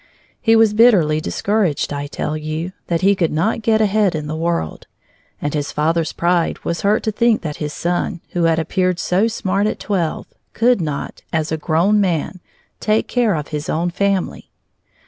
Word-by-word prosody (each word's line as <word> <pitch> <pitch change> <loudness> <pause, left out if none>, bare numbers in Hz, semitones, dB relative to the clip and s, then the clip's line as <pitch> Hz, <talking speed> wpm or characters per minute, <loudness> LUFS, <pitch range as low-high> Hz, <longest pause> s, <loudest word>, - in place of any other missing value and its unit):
He 225 -1 +4
was 225 -2 +5
bitterly 190 -10 +4
discouraged, 195 -6 0
I 145 0 -4
tell 150 +1 -3
you, 155 +3 -4 0.2
that 170 -1 0
he 195 +2 +5
could 170 -4 0
not 185 +9 0
get 220 0 +2
ahead 210 -3 +2
in 150 -1 -3
the 155 +1 -4
world. 165 - -2 0.5
And 145 - -3
his 145 -2 -2
father's 160 +2 0
pride 170 -1 +1
was 170 - -2
hurt 210 +2 +2
to 220 - 0
think 230 +1 +2
that 150 -3 -4
his 150 -1 -4
son 175 +2 -2
who 175 -1 0
had 165 -1 +3
appeared 180 +2 0
so 185 +5 +2
smart 200 -2 0
at - - -2
twelve 180 -6 -2 0.3
could 240 -2 +3
not, 150 -3 -4
as 160 -2 -1
a - - +1
grown 175 +7 +2
man, 185 0 -1 0.4
take 215 0 +1
care 235 -6 +1
of 150 -2 -4
his 150 0 -4
own 170 +2 0
family. 200 0 -1
175 Hz, 185 wpm, -19 LUFS, 155-210 Hz, 0.5 s, was